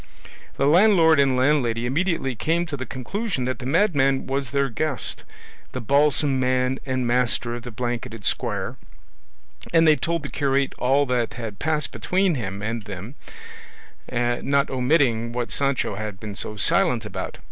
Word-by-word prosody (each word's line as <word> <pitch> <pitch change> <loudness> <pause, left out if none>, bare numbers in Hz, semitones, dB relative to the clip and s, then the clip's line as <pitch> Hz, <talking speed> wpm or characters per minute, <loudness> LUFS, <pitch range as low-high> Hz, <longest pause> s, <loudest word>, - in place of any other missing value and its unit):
The 135 - +2
landlord 165 -1 +5
and 135 -2 +3
landlady 125 -4 +2
immediately 150 0 0
came 165 +8 0
to 160 -4 -5
the 130 -1 -6
conclusion 165 - -3
that 130 +1 -2
the 125 - -5
madman 140 -5 +2
was 135 -1 -2
their 140 +1 +1
guest, 140 +3 -2 0.5
the 130 - -3
balsam 140 +2 +2
man 130 0 +1
and 130 -1 -1
master 120 0 +1
of 120 - -5
the 125 - -8
blanketed 120 -1 -4
squire, - - -2 0.9
and 165 -1 +5
they 155 - +7
told 170 0 -2
the 140 - -5
curate 140 -2 0
all 135 +3 +3
that 125 -3 -1
had 110 -5 -6
passed 155 -2 0
between 185 -1 +1
him 100 -7 -4
and 110 -1 -3
them, 100 +4 -7 1.0
not 125 +4 0
omitting 125 -3 +1
what 120 -1 -3
Sancho 140 -6 0
had 105 -1 -5
been 105 -1 -6
so 105 - -4
silent 115 +2 +2
about. 95 -2 -6
130 Hz, 160 wpm, -23 LUFS, 120-145 Hz, 1.0 s, they